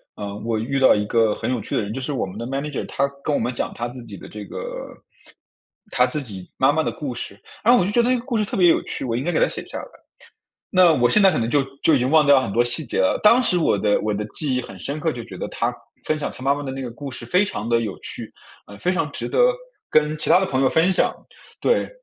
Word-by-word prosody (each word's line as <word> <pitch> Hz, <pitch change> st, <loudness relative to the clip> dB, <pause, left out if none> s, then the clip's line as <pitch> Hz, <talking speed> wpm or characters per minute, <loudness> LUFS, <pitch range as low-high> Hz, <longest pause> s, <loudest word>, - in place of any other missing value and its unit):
呃， 100 Hz, -1 st, -6 dB
我 115 Hz, 0 st, -2 dB
遇 135 Hz, +5 st, -1 dB
到 130 Hz, -, +6 dB
一 105 Hz, 0 st, -1 dB
个 110 Hz, -1 st, +2 dB
很 -, -, -3 dB
有 120 Hz, -4 st, -1 dB
趣 -, -, -4 dB
的 -, -, +2 dB
人， 105 Hz, +2 st, -5 dB
就 135 Hz, -, -4 dB
是 135 Hz, -, -3 dB
我 130 Hz, -, -1 dB
们 95 Hz, +2 st, -9 dB
的 115 Hz, -, -4 dB
manager。 140 Hz, +2 st, -3 dB
他 140 Hz, +1 st, 0 dB, 0.2 s
跟 150 Hz, -, 0 dB
我 -, -, +1 dB
们 125 Hz, -, -1 dB
讲 -, -, -3 dB
他 120 Hz, -, -3 dB
自 125 Hz, 0 st, -9 dB
己 100 Hz, -, -9 dB
的 -, -, -11 dB
这 105 Hz, -1 st, -8 dB
个 -, -, -7 dB, 1.3 s
他 125 Hz, 0 st, +3 dB
自 145 Hz, +3 st, -4 dB
己 95 Hz, -6 st, -10 dB
妈 135 Hz, +2 st, +4 dB
妈 160 Hz, +2 st, +1 dB
的 -, -, -1 dB
故 140 Hz, -4 st, -5 dB
事。 100 Hz, -3 st, -7 dB, 0.2 s
然 235 Hz, -, +5 dB
后 245 Hz, -, +6 dB
我 180 Hz, -, +2 dB
就 200 Hz, -, -1 dB
觉 240 Hz, +3 st, +4 dB
得 240 Hz, -, +1 dB
那 255 Hz, -, +3 dB
个 235 Hz, -, -8 dB
故 250 Hz, -3 st, -2 dB
事 215 Hz, -, +2 dB
特 200 Hz, -, -4 dB
别 180 Hz, -2 st, +5 dB
有 -, -, +3 dB
趣， -, -, -5 dB
我 115 Hz, -2 st, -1 dB
应 130 Hz, -, -2 dB
该 175 Hz, -, 0 dB
给 160 Hz, -, +1 dB
他 -, -, +4 dB
写 -, -, -5 dB
下 -, -, -7 dB
来。 -, -, -6 dB, 0.9 s
那 180 Hz, -3 st, +6 dB
我 120 Hz, -4 st, +3 dB
现 210 Hz, -, +4 dB
在 195 Hz, -, +7 dB
可 -, -, -2 dB
能 115 Hz, 0 st, -1 dB
就 140 Hz, +2 st, +3 dB, 0.2 s
就 160 Hz, -, +5 dB
已 140 Hz, -, +4 dB
经 125 Hz, +2 st, 0 dB
忘 155 Hz, -1 st, +5 dB
掉 140 Hz, -2 st, +6 dB
很 115 Hz, -, -3 dB
多 120 Hz, +4 st, +2 dB
细 125 Hz, +4 st, -1 dB
节 -, -, -3 dB
了。 95 Hz, -, +2 dB
当 235 Hz, +4 st, +6 dB
时 180 Hz, -6 st, +2 dB
我 150 Hz, -10 st, +2 dB
的 105 Hz, 0 st, +2 dB
我 105 Hz, -1 st, -1 dB
的 105 Hz, +1 st, -3 dB
记 135 Hz, +3 st, -3 dB
忆 125 Hz, -, -1 dB
很 95 Hz, -, -10 dB
深 145 Hz, +2 st, -4 dB
刻， 160 Hz, 0 st, 0 dB
就 120 Hz, -, -6 dB
觉 -, -, -10 dB
得 -, -, -4 dB
他 -, -, -1 dB, 0.3 s
分 155 Hz, 0 st, 0 dB
享 150 Hz, -, -3 dB
他 130 Hz, -, -11 dB
妈 140 Hz, +1 st, +3 dB
妈 145 Hz, -, -5 dB
的 135 Hz, -, -5 dB
那 135 Hz, -, -5 dB
个 120 Hz, -, -5 dB
故 135 Hz, +4 st, -8 dB
事 120 Hz, -2 st, -7 dB
非 180 Hz, +10 st, +3 dB
常 110 Hz, -, -5 dB
地 115 Hz, 0 st, +2 dB
有 105 Hz, -4 st, -5 dB
趣， -, -, -8 dB, 0.3 s
呃， 100 Hz, -, -12 dB
非 180 Hz, -, 0 dB
常 165 Hz, -5 st, 0 dB
值 -, -, -4 dB
得 -, -, -2 dB, 0.5 s
跟 155 Hz, 0 st, +2 dB
其 -, -, -1 dB
他 185 Hz, -, +6 dB
的 190 Hz, -, 0 dB
朋 130 Hz, -5 st, 0 dB
友 130 Hz, -, +4 dB
分 170 Hz, +4 st, +3 dB
享。 -, -, +1 dB, 0.5 s
对， 480 Hz, -, +2 dB
135 Hz, 340 characters per minute, -22 LUFS, 115-160 Hz, 1.3 s, 在